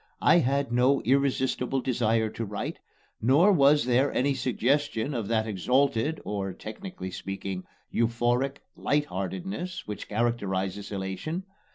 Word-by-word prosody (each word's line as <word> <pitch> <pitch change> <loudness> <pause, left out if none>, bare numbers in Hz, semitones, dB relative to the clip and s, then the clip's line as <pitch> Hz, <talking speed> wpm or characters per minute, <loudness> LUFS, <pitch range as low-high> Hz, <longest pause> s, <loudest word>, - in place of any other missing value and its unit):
I - - +6
had 140 -2 0
no 125 +3 +4
irresistible 130 0 +1
desire 115 -3 +1
to 115 - -4
write, 105 -1 -4 0.4
nor 145 - +5
was 145 -3 +5
there 130 +3 +3
any 140 +2 +1
suggestion 135 0 0
of 115 -5 -2
that 110 -1 +1
exalted, 130 - +1
or 95 -2 -3
(technically 110 - -7
speaking) 95 0 -5 0.3
euphoric, 120 +4 +1
light 145 +1 +1
heartedness 180 - -4
which 105 - -6
characterizes 100 -4 -1
elation. 95 - -3
120 Hz, 125 wpm, -27 LUFS, 105-140 Hz, 0.4 s, I